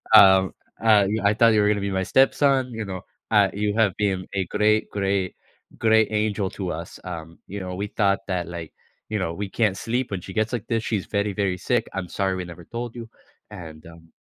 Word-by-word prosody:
Um, 95 -2 +7 0.3
uh, 105 -3 +6
"You 110 +2 -1
I 100 +1 +4
thought 115 0 +5
you 105 - +4
were 105 - +3
gonna 105 -1 +1
be 100 0 -2
my 95 0 0
stepson," 135 +1 +3
you 110 -2 -4
know, 95 -2 -5 0.3
uh, 105 -3 +5
"you 105 +1 -1
have 110 -4 +3
been 95 -3 0
a 95 -1 0
great, 105 +2 +2
great 95 -2 -1 0.4
great 110 -1 +4
angel 105 -2 0
to 95 -3 -4
us." 85 +2 -7
Um, 85 -2 -8
you 100 +2 -6
know, 90 -1 -5
"we 100 +3 -3
thought 100 -1 +1
that 90 -3 -2
like" 85 -2 -7 0.4
you 110 - -1
know, 85 -3 -2
"we 100 +3 -4
can't 105 -2 +1
sleep 120 +3 -2
when 95 -3 -3
she 95 - -9
gets 110 +4 0
like 115 - -3
this. 115 -1 0
She's 105 -5 -1
very, 100 0 -1
very 95 -2 0
sick. - - 0
I'm 95 -2 -3
sorry 95 +1 -1
we 95 - -4
never 85 -1 -11
told 120 +2 -6
you." 115 -1 -8 0.4
And, 80 -6 -10
um 85 0 -15
100 Hz, 225 wpm, -24 LUFS, 95-110 Hz, 0.4 s, Um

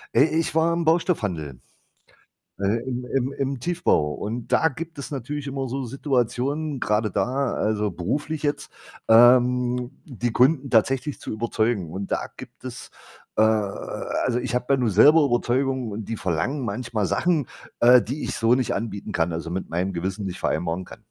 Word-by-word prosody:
Äh, 125 - +7
ich 160 0 -1
war 165 +1 +3
im 170 -1 -1
Baustoffhandel, 100 - 0 1.0
äh, 100 +4 +1
im 125 0 -3
im 130 +1 0
im 135 -2 -3
Tiefbau. 165 - +1
Und 115 +7 -5
da 160 - +4
gibt 160 +2 -8
es 140 - -6
natürlich 145 +2 -5
immer 135 -1 -3
so 135 +2 -3
Situationen, 135 +3 -1
grade 105 0 +1
da, 125 +7 0
also, 105 -1 0
beruflich 145 - -3
jetzt, 145 -1 -2 0.4
ähm, 125 +1 +5
die 120 -4 -3
Kunden 135 +3 +3
tatsächlich 135 +5 +1
zu - - -7
überzeugen. 110 -4 -1
Und 95 +3 -5
da - - -1
gibt - - -12
es, - - -8 0.5
äh 110 - +4
also, 110 +3 0
ich 125 0 -3
habe 125 0 -1
ja - - +3
nun 120 -3 +1
selber 150 - +6
Überzeugung 130 0 0
und 105 +1 -5
die 115 - -2
verlangen 100 - -1
manchmal 115 -1 -2
Sachen, 160 - +1 0.3
äh, 125 0 +7
die 135 +7 -4
ich - - -3
so 115 +1 +3
nicht 130 -1 0
anbieten 105 -2 -4
kann, 85 0 0
also, 85 0 -4
mit 95 +2 -4
meinem 90 +3 -1
Gewissen 95 +4 -3
nicht 90 -1 -5
vereinbaren 85 +2 -1
kann. - - -14
120 Hz, 170 wpm, -24 LUFS, 105-140 Hz, 1.0 s, Äh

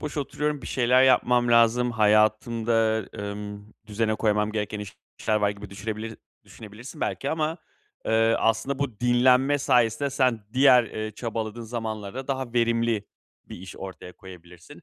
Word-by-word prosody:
boş 150 -1 -6
oturuyorum, 150 0 -2
bir - - -8
şeyler 125 0 +3
yapmam 125 -2 +3
lazım, 120 +1 +4
hayatımda, 110 +1 +2
emm, 105 0 -6 0.3
düzene 110 +1 -1
koymam 105 -1 0
gereken 105 -1 -3 0.4
işler 110 - +1
var," 105 -1 +1
gibi 100 -1 -10
düşünebilir, 110 +2 -6 0.3
düşünebilirsin 115 +7 -12
belki 135 - -2
ama, 160 +1 -2 0.5
eee, 115 0 +3
aslında 115 +5 0
bu 125 -7 -4
dinlenme 125 +3 +3
sayesinde 125 0 +2
sen 125 -6 0
diğer, 130 -2 +6
eee, 110 0 -5
çabaladığın 115 +1 -5
zamanlarda 110 +2 -5
daha 130 -3 -3
verimli 115 -3 +1 0.4
bir - - -10
iş 95 +1 -11
ortaya 95 -1 -9
koyabilirsin. 90 -2 -14
115 Hz, 140 wpm, -25 LUFS, 105-125 Hz, 0.5 s, diğer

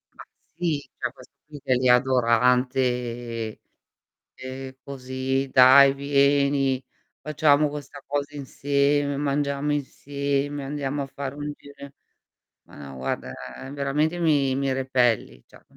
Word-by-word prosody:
Ma - - -11 0.3
sì, 165 -4 -2
c'è - - -3
questo - - -18
qui 150 -1 -11
che 130 - +1
è - - +3
lì 125 +1 +1
adorante. 125 -2 +1 0.7
"E, 130 0 -8
così, 130 0 -3
dai, 135 +2 +8
vieni 140 -1 +2 0.4
facciamo 150 -1 +3
questa 145 0 -9
cosa 145 +1 -3
insieme, 140 +1 0
mangiamo 145 0 -1
insieme, 140 0 -3
andiamo 140 0 -3
a 135 - -5
fare 140 0 -6
un 145 0 -5
giro 140 0 -15
in" 140 - -8 0.8
"Ma - - -17
no, 65 - -10
guarda 65 0 -4 0.4
veramente 145 +4 -1
mi 145 -5 +2
mi 135 0 -1
repelli." 125 - 0
Cioè, - - -19
140 Hz, 125 wpm, -24 LUFS, 130-145 Hz, 0.8 s, dai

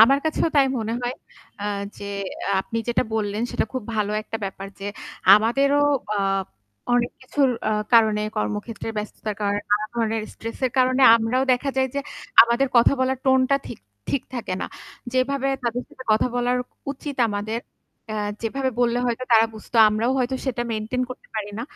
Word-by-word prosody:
আমার 275 +5 +6
কাছেও 315 +1 +1
তাই 275 -1 +6
মনে 225 0 -2
হয়, 245 +1 -2 0.5
আ - - -4 0.3
যে, - - -7 0.4
আ - - +1
আপনি 230 +4 -4
যেটা 240 - +2
বললেন 210 0 -1
সেটা - - 0
খুব 255 -2 -3
ভালো 210 -1 0
একটা 225 - -5
ব্যাপার 195 0 -6
যে - - -6 0.5
আমাদেরও 275 +7 +3 0.3
আ - - -1 0.8
অনেক 245 0 +2
কিছুর 270 +1 +2 0.2
আ - - +1 0.2
কারণে 220 -2 +5 0.2
কর্মক্ষেত্রে 105 - -3
ব্যস্ততার 210 0 -4
কারণে 205 0 0
নানা 210 +1 +2
ধরনের 225 -1 0
স্ট্রেস 230 0 -7
এর 250 - -4
কারণে 255 +1 +3
আমরাও 230 +4 +1
দেখা 265 +3 0
যায় 265 0 +2
যে 280 - 0 0.4
আমাদের 235 +4 +2
কথা 235 - +6
বলার 260 0 +1
টোন 265 0 +5
টা 275 - +5
ঠিক - - -8 0.3
ঠিক 275 - 0
থাকে 235 -6 -3
না। - - -2 0.5
যেভাবে 270 +1 +1
তাদের 240 +1 -1
সাথে 255 - -12
কথা 215 - +3
বলা 245 0 +1 0.4
উচিত 285 0 -7
আমাদের 210 +2 -2 0.5
আ - - -3 0.3
যেভাবে 260 +4 -1
বললে 240 0 +2
হয়তো 240 +1 -1
তারা 225 0 +6
বুঝতো 220 +2 -7
আমরাও 215 +3 0
হয়তো 255 +1 0
সেটা 245 -2 -1
মেইনটেইন 225 +4 -2
করতে 255 - -10
পারি 205 -1 -3
না। - - -3
235 Hz, 175 wpm, -23 LUFS, 215-260 Hz, 0.8 s, আমার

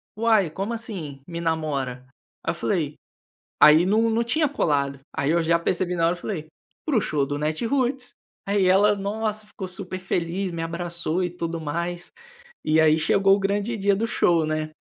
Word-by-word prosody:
"Uai 220 -6 +3
como 195 +7 -3
assim, 175 -12 -6
me 170 -1 -5
namora?" 140 -6 -2 0.4
Aí - - 0
eu - - -6
falei, 160 -6 -1 0.6
aí 155 +3 +7
não 220 +4 +3
não 230 +1 +1
tinha 305 +6 +1
colado, 140 - 0
aí 140 +3 0
eu 170 0 +3
já 170 +1 +3
percebi 180 +1 -1
na 165 -1 +2
hora 170 - +3
eu 175 - -10
falei: 160 -7 -4 0.4
"Para 290 -7 +1
o - - +3
show 145 -3 0
do 145 +1 -3
Natiruts", 245 - -1 0.3
aí 200 -1 +2
ela, 205 +3 +5
nossa, 210 +1 -3
ficou 190 -2 -7
super 185 0 -6
feliz, 185 +1 -2
me 165 -1 -4
abraçou 170 +1 -2
e 175 - -1
tudo 170 -1 -4
mais, 170 +3 -4 0.5
e 155 +1 +4
aí 155 0 +5
chegou 195 +5 +4
o - - -4
grande 205 +4 -1
dia 200 0 +2
do 225 +3 0
show, 165 -7 +2
né. 155 0 -2
175 Hz, 185 wpm, -24 LUFS, 160-205 Hz, 0.6 s, aí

